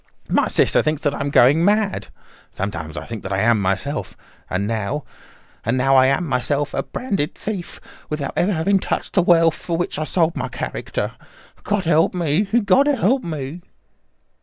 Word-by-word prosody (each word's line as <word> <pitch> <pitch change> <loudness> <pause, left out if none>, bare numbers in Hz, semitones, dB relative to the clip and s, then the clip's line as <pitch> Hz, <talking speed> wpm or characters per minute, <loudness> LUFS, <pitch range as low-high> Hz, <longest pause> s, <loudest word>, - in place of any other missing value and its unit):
My - - +3
sister - - +3
thinks 155 0 -1
that 145 -2 +1
I - - -5
am 140 - -1
going 140 +4 +5
mad. 205 +1 +1 0.4
Sometimes 85 -5 -5
I - - -5
think 115 -2 -6
that 95 - -6
I 95 - 0
am 110 -1 +3
myself. 100 +10 -2 0.3
And 95 +2 -1
now—and 115 +1 -5
now 135 +1 +3
I 130 0 +6
am 140 +6 +1
myself 140 +1 -1
a - - 0
branded 195 - -3
thief, 200 -5 -5 0.3
without 150 -3 -3
ever 190 - +2
having 190 +4 +2
touched - - -3
the 190 - +4
wealth 165 -2 +4
for 170 -2 -4
which 175 -3 -2
I 155 - -1
sold 165 0 +1
my - - -2
character. - - -4 0.5
God 205 -2 -1
help 165 +1 +3
me! 170 +3 +1
God 220 +5 +3
help 260 -2 +2
me!" 155 0 -5
155 Hz, 175 wpm, -21 LUFS, 130-185 Hz, 0.5 s, I